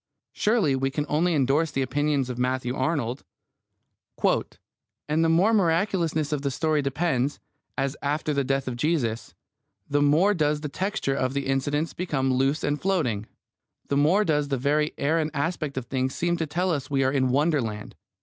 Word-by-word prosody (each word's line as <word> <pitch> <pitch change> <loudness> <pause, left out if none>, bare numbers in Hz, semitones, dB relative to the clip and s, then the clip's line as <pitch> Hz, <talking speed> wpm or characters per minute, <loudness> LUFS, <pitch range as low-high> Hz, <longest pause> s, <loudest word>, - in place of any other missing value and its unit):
Surely 210 - +2
we 135 +1 0
can 145 +2 -2
only 165 +4 +1
endorse 145 +4 +2
the 135 -2 -1
opinion 145 +2 0
of 125 -1 -4
Matthew 125 0 -1
Arnold: 130 -3 -1 1.8
And 155 +2 +1
the 165 - +3
more 180 +7 +4
the 225 - +4
miraculousness 165 -4 +1
of 150 -2 -1
the 140 - -1
story 155 +2 0
deepens, 140 -1 -1 0.4
as 135 0 -1
after 150 +1 -1
the 140 -1 +1
death 135 0 -1
of 125 -2 -3
Jesus, 125 -6 -1 0.5
the 145 0 +1
more 155 +8 +4
does 150 -4 0
the 150 - -4
texture 190 -3 -2
of 130 0 -1
the 140 -1 -1
incidents 145 +4 -1
become 135 -7 -1
loose 135 +4 +1
and 145 0 -1
floating, 130 - 0 0.6
the 140 - +1
more 175 +9 +3
does 150 -3 +1
the 140 -1 -1
very 150 +4 0
air 155 +4 +1
and 155 -1 0
aspect 150 -1 -2
of 130 - -3
things 130 +1 -2
seem 175 0 0
to 160 -2 -2
tell 180 +5 0
us 140 -5 -2
we 135 -1 +1
are 130 - +2
in 130 -2 +1
wonderland. 130 -7 0
145 Hz, 180 wpm, -25 LUFS, 135-160 Hz, 1.8 s, more